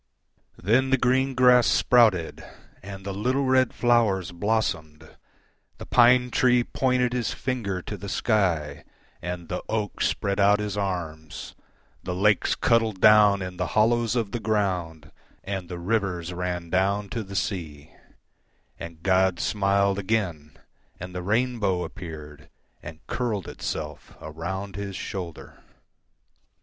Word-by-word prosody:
Then 120 +8 +2
the 135 - +3
green 130 +2 +1
grass 125 -1 +5
sprouted, 110 -10 +3 0.4
And 95 0 -9
the 100 - -4
little 125 +8 0
red 130 -1 +3
flowers 110 -8 +1
blossomed, 85 -6 -2 0.7
The - - -9
pine 125 0 +4
tree 125 -1 +3
pointed 125 -1 0
his 125 -3 -2
finger 100 -8 -3
to 105 - -6
the 100 - -7
sky, 95 -11 0 0.4
And 90 -1 -5
the - - -4
oak 110 -2 -2
spread 100 0 0
out 100 +1 +5
his 105 -1 -3
arms, 85 -6 -5 0.5
The 90 -1 -4
lakes 105 +2 +2
cuddled 115 -5 +1
down 105 -2 +6
in 90 -1 -7
the - - -1
hollows 115 +1 +3
of 115 -5 -1
the 120 - -3
ground, 90 -9 -2 0.3
And 95 -3 -5
the 90 - -5
rivers 90 -2 -2
ran 90 -1 -4
down 100 +2 +1
to 115 - -3
the 100 -1 -9
sea; 80 -7 -4 0.9
And 85 -1 -9
God 95 -2 +2
smiled 100 +2 +1
again, 95 -8 -2 0.4
And 90 +1 -8
the 90 - -4
rainbow 105 -3 0
appeared, 75 -5 -9 0.3
And 80 -2 -11
curled 110 -7 -2
itself - - -6
around 95 +5 -6
His 100 -1 -5
shoulder. 90 -5 -7
100 Hz, 135 wpm, -25 LUFS, 90-115 Hz, 0.9 s, down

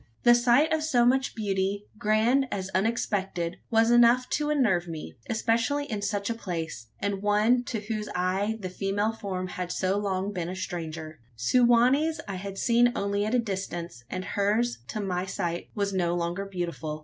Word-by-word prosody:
The 240 - +8
sight 245 +6 +4
of 315 - +1
so 255 -6 +3
much 265 +2 +2
beauty 200 -1 -1
grand 225 +6 +3
as 190 -1 -3
unexpected 190 -4 -1
was 225 +1 +4
enough 240 +1 +5
to 300 0 0
unnerve 215 -13 +2
one, 155 - -6 0.2
especially 230 +6 +1
in 215 -7 -4
such 205 0 -1
a 230 - 0
place 165 - -5
and 200 -1 -2
one 210 +4 +3
to 225 -4 -3
whose 215 0 -4
eye 190 +4 0
the 185 -3 -5
female 205 +3 -1
form 190 -4 -4
had 180 -1 -4
so 190 +2 0
long 195 -1 -1
been 175 -2 -3
a 185 - -4
stranger. 160 -4 -5 0.2
Su 120 - +2
wa 240 +1 +6
nee's 310 +3 +1
I 195 -2 -4
had 195 +1 -6
seen 240 +2 +4
only 200 +1 0
at 220 +4 0
a - - +4
distance; 180 - -4
and 185 0 -4
hers, 215 +4 0
to 215 - -4
my 185 -1 -2
sight, 170 -2 -3
was 200 -2 -1
no 175 -2 +1
longer 175 +3 -2
beautiful. 170 -6 -4
200 Hz, 185 wpm, -27 LUFS, 185-235 Hz, 0.2 s, The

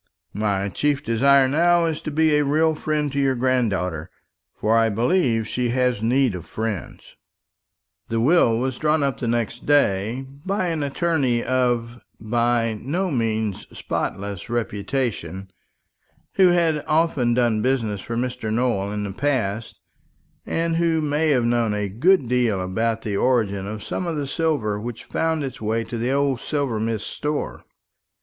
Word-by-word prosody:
My 100 -1 0
chief 140 - 0
desire 135 +3 +4
now 170 +4 +3
is 160 -2 -2
to - - -4
be 155 +1 +2
a 150 - +3
real 155 +3 +2
friend 150 -1 -1
to 140 - -2
your 135 -1 +2
granddaughter; 100 -10 0 0.5
for 110 +1 +1
I 115 0 +4
believe 115 - +1
she 125 +1 -1
has 125 -3 +1
need 125 +1 +2
of 85 -3 -7
friends." 110 -1 -5 0.9
The 115 - 0
will 120 -3 +4
was 130 +1 -2
drawn 155 -1 +2
up 140 -2 -1
next 120 -1 -2
day 120 -3 +2 0.2
by 190 -2 -1
an 160 -2 -2
attorney 140 -4 0
of 120 -2 0 0.2
by 115 0 0
no 175 +8 -1
means 110 -5 -1
spotless 100 0 -4
reputation, 105 -5 -3 0.8
who 190 -1 +5
had 165 -4 +2
often 155 -7 +2
done 120 -3 +2
business 115 -6 0
for 115 - -5
Mr. 125 -2 -2
Nowell 110 -4 0
in 105 0 -3
the 100 -1 -4
past, 115 -5 -2 0.7
and 165 0 0
who 165 -1 +2
may 150 +1 +1
have 125 -5 +3
known 120 -3 +1
a 105 -1 -1
good 140 - +3
deal 120 -5 +1
about 110 +5 -1
the 100 -2 -2
origin 100 -6 +1
of 105 0 -6
some 180 - -3
of 165 - -2
the 145 - -2
silver 135 -9 -1
which 120 0 -6
found 160 -2 -1
its 130 -4 -6
way 110 +1 0
to 115 0 -6
the 120 +3 0
old 140 -2 +1
silversmith's 115 -7 -2
stores. 150 0 -3
120 Hz, 155 wpm, -23 LUFS, 110-145 Hz, 0.9 s, who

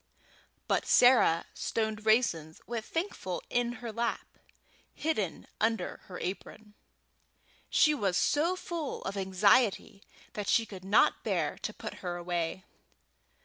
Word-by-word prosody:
But - - 0
Sarah 245 -10 +5
stoned 220 -1 -3
raisins 165 -9 +2
with 230 -2 -4
Thankful 325 - -4
in 240 0 +1
her 230 - -3
lap, 235 +2 -3 0.6
hidden 215 - -2
under 225 +1 0
her 180 - -8
apron. 205 +3 -6 1.0
She 300 - +4
was 195 -10 0
so 325 - +2
full 335 -5 -5
of 195 - -4
anxiety 200 +2 +2 0.3
that 205 -2 -4
she 230 - +3
could 190 -4 -10
not 195 +3 +3
bear - - 0
to - - -4
put - - -7
her 175 -2 -3
away. 175 +1 -3
215 Hz, 125 wpm, -30 LUFS, 185-240 Hz, 1.0 s, Sarah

